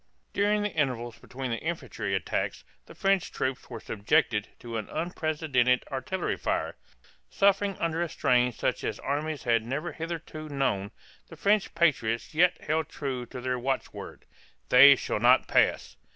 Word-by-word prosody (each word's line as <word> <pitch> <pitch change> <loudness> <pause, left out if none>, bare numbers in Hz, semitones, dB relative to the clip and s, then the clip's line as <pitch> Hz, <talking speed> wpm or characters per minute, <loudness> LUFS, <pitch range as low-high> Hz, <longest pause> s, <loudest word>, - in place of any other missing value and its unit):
During 205 +1 +2
the 210 - -2
intervals 120 -5 -1
between 130 -1 -6
the 115 - -2
infantry 165 +1 -3
attacks - - -2 0.2
the - - -13
French 195 -2 +1
troops 130 0 -3
were 120 -3 -6
subjected 110 0 +1
to 115 -1 -6
an 110 - -5
unprecedented 155 -6 0
artillery 135 +8 -2
fire. - - -2 0.5
Suffering 200 0 +2
under 165 0 -1
a 175 - -1
strain 125 -3 +2
such - - -2
as - - -2
armies 150 +1 -3
had 115 -2 +2
never 140 +9 -3
hitherto 160 -2 -6
known, 130 -9 -1 0.4
the - - -12
French 205 0 +1
patriots 130 -10 +1
yet 180 +3 +3
held 155 0 -1
true 130 -4 -4
to 125 - -8
their 125 0 -2
watchword, 130 +2 -4 0.4
"They 140 +2 +9
shall 115 - -3
not 125 +3 +5
pass." - - +2
140 Hz, 150 wpm, -28 LUFS, 125-165 Hz, 0.5 s, They